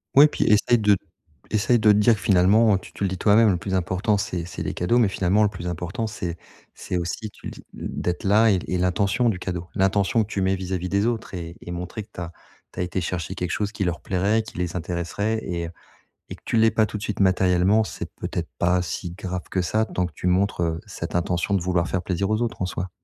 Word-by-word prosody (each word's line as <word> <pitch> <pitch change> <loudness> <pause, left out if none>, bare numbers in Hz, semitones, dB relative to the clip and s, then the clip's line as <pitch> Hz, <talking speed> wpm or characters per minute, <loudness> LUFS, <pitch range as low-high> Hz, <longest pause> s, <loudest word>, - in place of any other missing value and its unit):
Ouais 145 +2 +9
puis - - -1
essaie 110 +3 +4
de 105 -2 +4 0.5
essaie 110 +3 +3
de 110 -1 +5
te 105 - +4
dire 110 +2 +5
que - - -10
finalement 100 +3 +4
tu 95 - -11
tu - - -5
le 100 - +2
dis 95 - -4
toi-même 110 +3 +5
le 90 - +1
plus 95 +1 -5
important 95 +4 +1
c'est 90 -4 -3
c'est 85 - -6
les - - -3
cadeaux, 90 +7 +1
mais 115 -5 +4
finalement 95 +2 +2
le 105 - +3
plus 90 -3 -7
important 90 +7 -3
c'est 90 -5 -5 0.4
c'est 90 - -4
aussi, 90 +5 -3
tu - - -11
le - - -5
dis, - - -12
d'être 90 0 -3
là 105 +3 +5
et 95 - +2
et 90 - 0
l'intention 100 +6 +2
du 100 - -1
cadeau. 90 -2 -4
L'intention 100 +3 +2
que - - -9
tu 100 - -2
mets 95 +1 +2
vis-à-vis 90 -1 -3
des 100 +2 +1
autres 115 -4 -2
et 85 -2 -6
et 85 - -8
montrer 90 +5 -5
que 105 - -23
tu - - -7
as 85 -1 -5 0.4
tu - - -8
as - - +1
été 90 +1 -2
chercher 90 0 -3
quelque 90 -2 -3
chose 105 -1 -1
qui 105 - -3
leur 90 -2 -2
plairait, 100 +4 +1
qui 110 - -11
les 90 -1 -2
intéresserait 90 +5 -2
et 85 -1 -3
heu, - - -8 0.6
et - - -5
que - - -27
tu - - -1
l'aies 115 0 +5
pas 110 -1 +2
tout 105 - -6
de - - -10
suite 105 -1 -4
matériellement, 95 +2 +3
c'est - - -6
peut-être - - -4
pas 90 +1 +2
si 90 0 -4
grave 90 -1 -5
que 95 - 0
ça 110 +5 +1
tant 90 -4 -2
que 90 - -10
tu - - -5
montres, 95 +1 +2
heu, 80 -1 -1
cette - - -6
intention 90 +2 0
de 95 - +2
vouloir 90 -1 +1
faire 95 - -1
plaisir 95 +2 -1
aux 110 +1 +1
autres 120 - -3
en - - 0
soi. 90 +1 -4
95 Hz, 255 wpm, -24 LUFS, 90-105 Hz, 0.6 s, Ouais